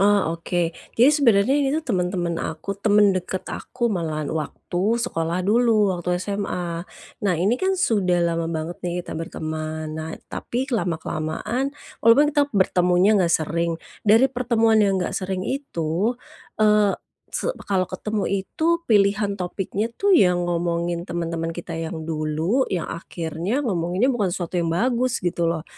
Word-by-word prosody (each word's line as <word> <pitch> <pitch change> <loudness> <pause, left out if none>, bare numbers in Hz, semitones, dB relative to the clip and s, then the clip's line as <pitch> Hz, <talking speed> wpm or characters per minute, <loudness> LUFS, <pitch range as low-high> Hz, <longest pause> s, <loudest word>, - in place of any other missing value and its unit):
Oh, 200 -4 +3
oke. 170 -1 -1 0.2
Jadi 245 +5 +7
sebenarnya 240 -6 +4
ini 280 -2 +2
tuh 320 - -3
temen-temen 180 -2 -1
aku, 160 +5 -4
temen 205 -1 +4
deket 185 0 -3
aku 240 -2 -2
malahan 155 -4 -2
waktu 175 +7 -1
sekolah 175 -6 -1
dulu 215 -2 +3
waktu 180 0 -1
SMA. 180 -3 -3 0.4
Nah, 195 -4 +2
ini 190 +8 +2
kan 380 0 +2
sudah 185 - +2
lama 165 -1 0
banget 165 +1 -4
nih 175 0 -3
kita - - -7
berteman. 155 -1 -4
Nah, 160 +1 -5 0.2
tapi 250 +2 -2
lama-kelamaan 175 - -2 0.3
walaupun 230 +6 +6
kita 290 0 +2
bertemunya 180 +2 +4
nggak 170 -2 +2
sering, 165 +1 -1 0.3
dari 225 +5 +6
pertemuan 230 -3 +3
yang 200 -2 +3
nggak 180 - -1
sering 185 -1 -2
itu, 210 - -1 0.4
eee, 210 -1 +4 0.4
se - - -1 0.2
kalau 185 -2 0
ketemu 210 +3 -2 0.2
itu 335 - 0
pilihan 200 -1 +2
topiknya 195 +4 -2
tuh 400 0 +2
yang 180 - +4
ngomongin 170 0 -1
temen-temen 165 -1 -2
kita 165 +1 -6
yang 165 0 -4
dulu, 160 - 0
yang 180 -3 -1
akhirnya 170 - -3
ngomonginnya 185 +4 +1
bukan 210 -6 0
sesuatu 175 0 -2
yang 165 - 0
bagus 245 +8 +1
gitu 170 -1 +1
loh. 165 -1 -2
185 Hz, 145 wpm, -23 LUFS, 170-220 Hz, 0.4 s, Jadi